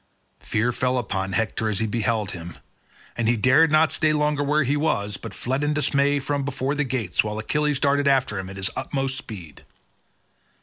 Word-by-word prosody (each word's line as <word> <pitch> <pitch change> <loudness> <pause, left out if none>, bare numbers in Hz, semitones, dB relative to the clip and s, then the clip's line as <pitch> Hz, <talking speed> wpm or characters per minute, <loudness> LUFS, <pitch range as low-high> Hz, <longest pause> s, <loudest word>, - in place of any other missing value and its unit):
Fear 110 +3 0
fell 125 +1 0
upon 95 -4 -2
Hector 110 +1 0
as 105 - -1
he 110 - 0
beheld 110 -1 -1
him, 85 -1 -8 0.6
and 115 -1 0
he 120 - +2
dared 135 +8 +4
not 155 0 +4
stay 155 0 +2
longer 150 -1 +1
where 150 +1 +2
he 140 +2 0
was 105 -9 0
but - - -8
fled 130 +4 -1
in 145 0 0
dismay 140 0 +2
from 140 +1 -2
before 135 0 -2
the 150 0 0
gates, 120 -9 0
while 105 0 -3
Achilles 150 +5 0
darted 140 0 +2
after 130 -7 +2
him 95 0 -6
at 95 - -9
his 95 0 -1
utmost 135 -1 -2
speed. 90 - -9
130 Hz, 190 wpm, -24 LUFS, 105-145 Hz, 0.6 s, dared